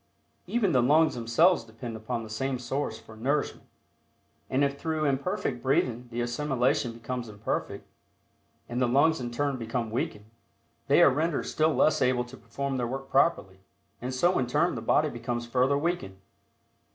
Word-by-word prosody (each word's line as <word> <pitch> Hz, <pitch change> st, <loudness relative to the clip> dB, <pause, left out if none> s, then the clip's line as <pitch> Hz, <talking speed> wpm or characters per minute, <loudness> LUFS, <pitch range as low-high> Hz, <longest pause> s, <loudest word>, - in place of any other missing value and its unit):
Even 220 Hz, -6 st, +1 dB
the 130 Hz, -4 st, +4 dB
lungs 150 Hz, +4 st, +4 dB
themselves 120 Hz, +9 st, +3 dB
depend 115 Hz, +1 st, -8 dB
upon 115 Hz, +2 st, -4 dB
the 110 Hz, -, -9 dB
same 130 Hz, +4 st, -2 dB
source 130 Hz, +4 st, -3 dB
for 110 Hz, -, -14 dB
nourishment, 140 Hz, +7 st, -2 dB, 0.8 s
and 135 Hz, +2 st, +2 dB
if 140 Hz, 0 st, 0 dB
through 160 Hz, -2 st, -1 dB
imperfect 135 Hz, -2 st, -1 dB
breathing 125 Hz, -2 st, 0 dB
the 120 Hz, +1 st, -2 dB
assimilation 125 Hz, +1 st, 0 dB
becomes 120 Hz, 0 st, -5 dB
imperfect, 105 Hz, -1 st, -4 dB, 0.8 s
and 120 Hz, +2 st, -3 dB
the 125 Hz, -, +3 dB
lungs 145 Hz, +6 st, +3 dB
in 120 Hz, -, -3 dB
turn 140 Hz, +3 st, -1 dB
become 115 Hz, -1 st, -3 dB
weakened, 105 Hz, -3 st, -3 dB, 0.6 s
they -, -, +6 dB
are -, -, +7 dB
rendered 155 Hz, +3 st, 0 dB
still 155 Hz, 0 st, +1 dB
less 155 Hz, -, +3 dB
able 125 Hz, -1 st, +2 dB
to 120 Hz, +2 st, -12 dB
perform 135 Hz, +3 st, -4 dB
their 120 Hz, -2 st, -1 dB
work 135 Hz, +2 st, -6 dB
properly, 120 Hz, -, +2 dB, 0.4 s
and 125 Hz, +2 st, -3 dB
so 175 Hz, +8 st, +2 dB
in 125 Hz, -, 0 dB
turn 150 Hz, +8 st, +2 dB
the -, -, -4 dB
body 155 Hz, -, +3 dB
becomes 120 Hz, -1 st, -4 dB
further 130 Hz, +4 st, +2 dB
weakened. 160 Hz, -, -2 dB
130 Hz, 165 wpm, -28 LUFS, 120-145 Hz, 0.8 s, are